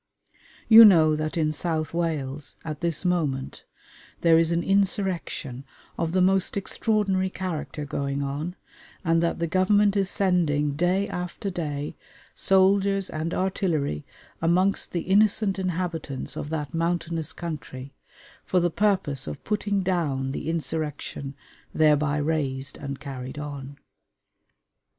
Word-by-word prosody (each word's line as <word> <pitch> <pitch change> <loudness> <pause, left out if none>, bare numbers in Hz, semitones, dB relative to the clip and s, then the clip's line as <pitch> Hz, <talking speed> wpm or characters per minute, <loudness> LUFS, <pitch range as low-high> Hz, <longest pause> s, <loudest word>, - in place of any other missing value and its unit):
You 225 0 +11
know 160 -7 +7
that 155 +2 -3
in 155 -2 +1
South 155 -1 -2
Wales, 150 -4 -3
at 155 -2 -5
this 170 0 -1
moment, 150 -7 -1 0.6
there 165 -1 +5
is 165 0 +2
an 170 0 +1
insurrection 190 -9 0 0.3
of 165 -1 -2
the 185 +1 +3
most 190 +1 +2
extraordinary 195 -2 0
character 160 -5 -4
going 140 0 -2
on, 150 +6 -4 0.5
and 165 0 +3
that 170 - 0
the 170 - -1
Government 200 +4 +3
is 195 -1 +1
sending, 165 -8 +1
day 180 +7 +1
after 180 +2 -4
day, 150 -4 -4 0.4
soldiers 195 0 +3
and 155 +2 -3
artillery 170 - -1 0.4
amongst 180 +4 +2
the 170 - -1
innocent 200 +1 +3
inhabitants 170 -6 -3
of 145 - -5
that 150 -3 -4
mountainous 165 -1 -1
country 140 -5 -7 0.5
for 185 - +1
the 175 -1 +1
purpose 175 -9 0
of - - -6
putting 205 -2 -1
down 145 -8 -1
the 150 - -4
insurrection 150 -3 -3 0.4
thereby 150 -1 +3
raised 140 -3 -1
and 140 -1 -6
carried 130 -1 -7
on. 140 -1 -7
165 Hz, 125 wpm, -25 LUFS, 145-185 Hz, 0.6 s, You